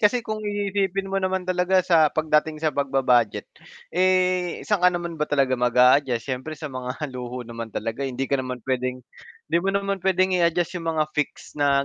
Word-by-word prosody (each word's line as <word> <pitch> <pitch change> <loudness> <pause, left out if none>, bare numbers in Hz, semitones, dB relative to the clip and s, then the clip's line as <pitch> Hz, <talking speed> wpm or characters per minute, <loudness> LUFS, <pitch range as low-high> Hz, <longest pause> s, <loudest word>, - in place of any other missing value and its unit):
kasi 230 +3 +3
kung 215 -2 -4
iisipin 200 -2 -2
mo 195 - +1
naman 185 -1 -1
talaga 185 0 +2
sa 165 -4 +5
pagdating 155 0 +1
sa 155 0 -1
pagba-budget, 130 -5 +1 0.5
eh, 185 -1 +1
saan 210 -3 +1
ka 180 - +6
naman 170 -2 -4
ba 150 - 0
talaga 135 -3 +2
mag-a-adjust? 125 0 +4
Siyempre 135 +4 -5
sa 150 -2 -7
mga 125 0 -5 0.2
luho 125 0 -6
naman 115 -1 -7
talaga 115 +3 -4
hindi 130 +1 -3
ka 140 0 0
naman 130 -2 -6
puwedeng 130 -1 -2 0.4
hindi 170 - +2
mo 190 - -2
naman 200 0 -1
puwedeng 185 0 +2
i-adjust 170 0 +1
'yong 165 - -4
mga 155 - +3
fix 150 - -3
na 140 -1 +2
155 Hz, 180 wpm, -24 LUFS, 130-185 Hz, 0.5 s, ka